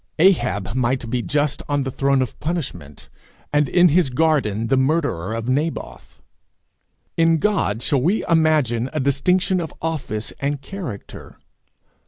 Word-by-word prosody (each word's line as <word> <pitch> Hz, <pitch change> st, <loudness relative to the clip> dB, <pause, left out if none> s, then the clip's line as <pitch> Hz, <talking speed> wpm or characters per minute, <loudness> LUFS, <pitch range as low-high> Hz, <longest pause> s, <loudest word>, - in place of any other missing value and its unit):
Ahab 120 Hz, -, +2 dB
might 125 Hz, -1 st, 0 dB
be 125 Hz, -1 st, 0 dB
just 145 Hz, +2 st, -1 dB
on 145 Hz, -1 st, +1 dB
the 130 Hz, -, -3 dB
throne 135 Hz, 0 st, +2 dB
of 125 Hz, -, -8 dB
punishment, 125 Hz, -, -5 dB, 0.5 s
and 145 Hz, -2 st, +2 dB
in 175 Hz, 0 st, +5 dB
his 165 Hz, -2 st, +3 dB
garden 125 Hz, -7 st, +1 dB
the 125 Hz, -, +2 dB
murderer 130 Hz, -, 0 dB
of 115 Hz, +1 st, -4 dB
Naboth. 150 Hz, +5 st, -3 dB, 0.9 s
In 165 Hz, 0 st, +4 dB
God 155 Hz, -, 0 dB
shall 140 Hz, -4 st, +1 dB
we 185 Hz, -, +1 dB
imagine 150 Hz, -7 st, +2 dB
a 155 Hz, -, -1 dB
distinction 180 Hz, +7 st, +1 dB
of 160 Hz, -, -5 dB
office 140 Hz, -10 st, -4 dB
and 140 Hz, +1 st, -1 dB
character? 140 Hz, -, -8 dB
140 Hz, 140 wpm, -21 LUFS, 125-165 Hz, 0.9 s, in